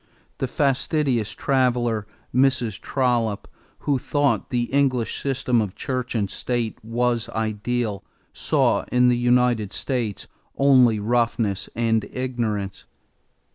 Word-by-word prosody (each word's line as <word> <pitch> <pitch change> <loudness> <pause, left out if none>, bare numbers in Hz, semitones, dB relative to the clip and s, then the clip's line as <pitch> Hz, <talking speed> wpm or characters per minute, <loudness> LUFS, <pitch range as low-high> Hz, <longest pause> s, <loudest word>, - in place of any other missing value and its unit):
The 130 - 0
fastidious 135 -4 0
traveler, 120 -5 +1 0.3
Mrs. 125 -5 +2
Trollope, 120 -6 0 0.3
who 140 -3 +1
thought 145 +2 0
the 120 -1 0
English 130 -4 +1
system 125 -3 +1
of 105 -3 -4
church 130 -2 -3
and 105 -3 +1
state 120 +2 -3
was 120 +1 0
ideal, 110 0 -2 0.3
saw - - +1
in 125 0 +4
the 125 - +3
United 120 -4 +2
States 120 -4 -3 0.3
only 130 -5 +5
roughness 115 -2 0
and 115 -2 +1
ignorance. 115 -6 -3
120 Hz, 110 wpm, -23 LUFS, 110-130 Hz, 0.3 s, only